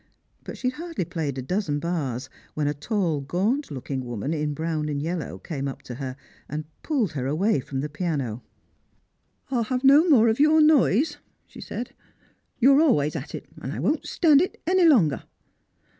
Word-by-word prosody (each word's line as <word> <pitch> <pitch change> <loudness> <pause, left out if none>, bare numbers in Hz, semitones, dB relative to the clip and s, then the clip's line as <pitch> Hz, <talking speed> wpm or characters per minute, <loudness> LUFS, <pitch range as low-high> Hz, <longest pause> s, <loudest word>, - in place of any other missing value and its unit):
But - - -8
she 255 - 0
had 255 - -15
hardly 330 - -4
j^layed 155 -5 -3
a 130 - -4
dozen 165 0 -1
bars 145 -6 -3 0.3
when 150 -1 0
a 145 - +1
tall 165 - -1
gaunt 205 - -1
looking 135 -1 -4
woman, 120 +4 -3
in 150 -2 -2
brown 160 -1 -2
and 145 -1 -2
yellow, 160 - -3
came 140 - -5
up 135 - -7
to 125 - -7
her 130 -1 -4 0.3
and 150 +1 -4 0.2
pulled 255 - 0
her 135 -3 -3
away 160 +4 +1
from 135 0 -4
the 150 - -2
piano. 145 - -3 0.6
" - - -41
I'll 240 -4 +1
have 255 +2 -2
no 290 +6 +6
more 235 -7 +6
of 220 +2 +1
your 305 +2 +5
noise," 300 - +4 0.3
she - - -13
said; 240 - -6 0.4
" - - -41
you're 275 +4 +6
always 150 - +2
at - - -5
it, - - -7 0.2
and - - -4
I - - -5
won't - - 0
stand 305 -4 +4
it 370 - -2
any 365 +1 +4
longer." 200 - +4
165 Hz, 190 wpm, -25 LUFS, -, 0.6 s, no